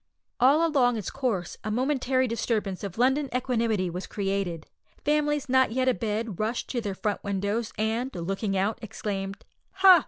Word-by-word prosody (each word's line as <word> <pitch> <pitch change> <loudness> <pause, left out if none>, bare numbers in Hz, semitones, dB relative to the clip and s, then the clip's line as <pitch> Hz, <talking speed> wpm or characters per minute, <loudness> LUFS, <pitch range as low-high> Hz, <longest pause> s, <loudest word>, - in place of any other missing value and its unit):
All 280 +7 +5
along 250 -6 +3
its 210 - -4
course 230 -11 -2
a 215 - -3
momentary 260 +2 +1
disturbance 215 -5 -1
of 195 -1 -5
London 265 +4 +2
equanimity 230 -6 +1
was 180 +2 -5
created. 195 -5 -2 0.4
Families 295 -1 +1
not 260 -2 +3
yet 260 +1 +1
abed 225 -4 -1
rushed 220 +3 -1
to 245 - -1
their 200 -3 -3
front 210 +1 -2
windows, 205 +3 -1
and, 225 +4 0
looking 195 +3 -1
out, 200 +3 0
exclaimed, 195 -2 -4 0.3
"Ha! 380 -2 +8
225 Hz, 155 wpm, -27 LUFS, 200-260 Hz, 0.4 s, Ha